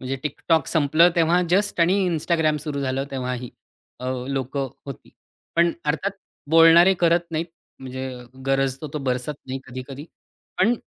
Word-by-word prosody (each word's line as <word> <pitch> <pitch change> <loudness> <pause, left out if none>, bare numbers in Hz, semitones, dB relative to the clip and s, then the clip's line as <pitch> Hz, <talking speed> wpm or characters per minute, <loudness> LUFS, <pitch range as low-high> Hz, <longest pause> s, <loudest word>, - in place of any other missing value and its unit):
म्हणजे 130 +1 -3
TikTok 155 +1 0
संपलं 160 +2 +4
तेव्हा 170 +2 +3
जस्ट 195 -1 +1
आणि 175 +3 +4
Instagram 160 -2 +1
सुरू 145 -2 -3
झालं 135 0 -1
तेव्हाही 125 -2 -4 0.5
अ, 125 - -5 0.2
लोकं 135 0 -2 0.2
होती. 140 - -9 0.5
पण 170 0 +4
अर्थात 160 +7 0 0.4
बोलणारे 165 +3 +7
करत 170 0 +3
नाहीत. 165 +1 -2 0.3
म्हणजे 130 0 -6 0.4
'गरजतो 135 +2 0
तो - - -1
बरसत 130 +1 -2
नाही' 130 +1 -4
कधी-कधी. 130 +3 -8 0.5
पण 220 +6 +4
150 Hz, 140 wpm, -23 LUFS, 130-170 Hz, 0.5 s, बोलणारे